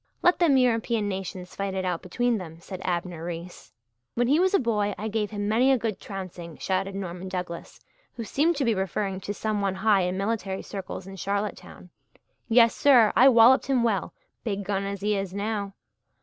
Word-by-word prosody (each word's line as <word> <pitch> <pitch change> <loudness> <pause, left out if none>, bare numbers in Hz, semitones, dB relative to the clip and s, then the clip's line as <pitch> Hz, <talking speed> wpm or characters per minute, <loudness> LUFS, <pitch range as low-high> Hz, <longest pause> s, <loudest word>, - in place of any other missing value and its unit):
"Let 355 - +4
them 315 -6 +4
European 230 -3 +1
nations 190 -2 -5
fight 195 -1 -3
it 190 -1 -2
out 180 -2 -1
between 240 +5 0
them," 165 -3 -9
said 185 +2 -8
Abner 175 -2 -3
Reese. 175 +1 -7 0.4
"When 245 - +2
he 290 +5 +4
was 375 +2 +3
a - - +4
boy 210 -4 0
I 215 - -4
gave 210 -1 -1
him 205 -1 -3
many 240 +5 +3
a 265 - +4
good 225 -4 -3
trouncing," 180 -4 -8
shouted 195 +1 -2
Norman 185 -1 -5
Douglas, 180 -2 -6 0.4
who 235 - -5
seemed 310 +9 +1
to 280 -2 0
be 230 - +3
referring 190 0 -2
to 200 - -4
some 215 -1 -1
one 195 -1 0
high 200 0 +3
in 180 +1 -1
military 195 -1 -2
circles 195 -2 -7
in 195 0 -9
Charlottetown. 200 -2 -4 0.6
"Yes, 230 0 +5
sir, 245 -7 +5
I 260 +3 +8
walloped 245 +2 +6
him 260 -3 +2
well, 220 -5 0 0.3
big 205 -3 -2
gun 195 0 -2
as 200 -1 -4
he 210 +1 +1
is 195 -1 -3
now." 200 -1 -3
200 Hz, 195 wpm, -26 LUFS, 190-230 Hz, 0.6 s, I